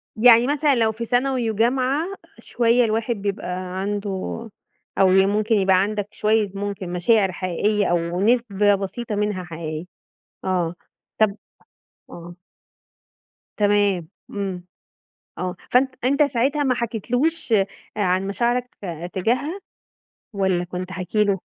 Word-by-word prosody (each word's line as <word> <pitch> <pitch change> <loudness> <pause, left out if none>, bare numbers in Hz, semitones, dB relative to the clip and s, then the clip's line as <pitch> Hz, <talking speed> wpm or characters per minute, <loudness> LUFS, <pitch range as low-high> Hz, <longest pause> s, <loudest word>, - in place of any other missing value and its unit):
يعني 235 +1 +6
مثلًا 290 0 +2
لو 225 -2 +2
في 230 +2 -5
ثانوي 245 -1 +1
و - - -6
جامعة، 260 - +1 0.3
شوية 240 +1 +2
الواحد 225 +2 0
بيبقى 200 0 -4 0.3
عَنده 205 +1 -2 0.9
أو 195 - +5
ممكن 205 +4 +3
يبقى 190 -2 +4
عَندك 205 0 -2
شوية، 215 -2 +1
ممكن 200 -2 -4
مشاعر 190 +2 +3
حقيقية 200 +3 0
أو 175 +1 0
نسبة 210 -3 +3
بسيطة 200 +3 -4
منها 205 -3 -1
حقيقية، 160 -1 -6 0.6
آه. 180 -3 0 0.4
طَب 215 -2 +3 0.7
آه. 175 0 -10 1.2
تمام. 205 -4 +2 0.2
إمم. 190 -3 -4 0.7
آه، 180 -1 -3
فأن 255 +2 +4 0.2
أنت 280 +3 +3
ساعتها 285 +1 +1
ما 255 -2 +2
حكيتلهوش 245 - -1
آآ، 195 -3 +4 0.3
عن 185 -1 +1
مشاعرك 240 +5 -1 0.4
تجاهها 255 - -1 0.7
والَّا 190 -3 +1
كنت 180 +1 -6
حاكي 185 +4 0
له؟ 200 -2 +1
205 Hz, 120 wpm, -22 LUFS, 190-240 Hz, 1.2 s, يعني